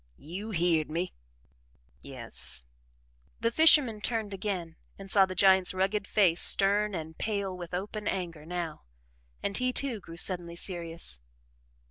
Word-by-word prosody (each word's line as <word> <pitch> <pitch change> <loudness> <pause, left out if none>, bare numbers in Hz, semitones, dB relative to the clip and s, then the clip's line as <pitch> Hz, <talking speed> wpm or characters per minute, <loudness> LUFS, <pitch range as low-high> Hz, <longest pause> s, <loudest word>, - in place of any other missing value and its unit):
"You 185 +8 -7
heerd 170 -5 +1
me!" 170 +4 -3 0.9
"Yes." 115 - -5 0.7
The 230 0 +1
fisherman 270 -7 +6
turned 220 -3 -2
again 185 -4 -4 0.2
and 195 -1 -9
saw 195 -2 +6
the 185 - -6
giant's 190 -1 +4
rugged 195 +2 0
face 175 -5 +3
stern 205 +1 +3
and 160 -1 -6
pale 200 -3 -2
with 175 -1 -6
open 210 +3 -4
anger 170 -5 -3
now, 170 -1 -5 0.6
and 200 - -2
he, 255 +3 +1
too, 255 -3 -2
grew 165 -3 -11
suddenly 175 -1 -1
serious. 170 - 0
185 Hz, 135 wpm, -29 LUFS, 170-210 Hz, 0.9 s, fisherman